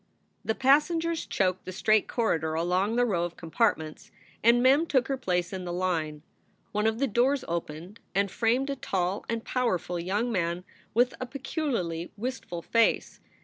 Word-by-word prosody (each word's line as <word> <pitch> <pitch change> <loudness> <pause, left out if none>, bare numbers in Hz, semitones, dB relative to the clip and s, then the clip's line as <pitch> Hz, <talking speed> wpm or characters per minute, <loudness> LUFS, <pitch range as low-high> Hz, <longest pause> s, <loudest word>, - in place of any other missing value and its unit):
The 220 - -1
passengers 325 +5 +2
choked 185 -1 0
the 185 - -5
straight 215 +3 +2
corridor 160 -9 0
along 180 +6 +1
the 245 0 +3
row 185 -7 0
of 175 0 -4
compartments, 160 -3 -1 0.3
and 235 +2 +5
Mem 280 +6 +5
took 260 -5 +2
her 270 - +1
place 180 -7 -1
in 185 -1 -4
the 175 - -4
line. 165 -4 -1 0.5
One 210 +1 +1
of 220 0 0
the 275 - +2
doors 260 +3 +1
opened 170 +4 -5 0.2
and 200 -1 +2
framed 250 +5 +1
a - - -2
tall 190 -5 -1
and 230 -1 -2
powerful 180 -9 -1
young 205 +8 -1
man 175 -3 -1 0.3
with 245 +2 +4
a 255 - -3
peculiarly 245 - -3
wistful 210 -7 -5
face. 230 -1 +1
210 Hz, 165 wpm, -28 LUFS, 175-250 Hz, 0.5 s, and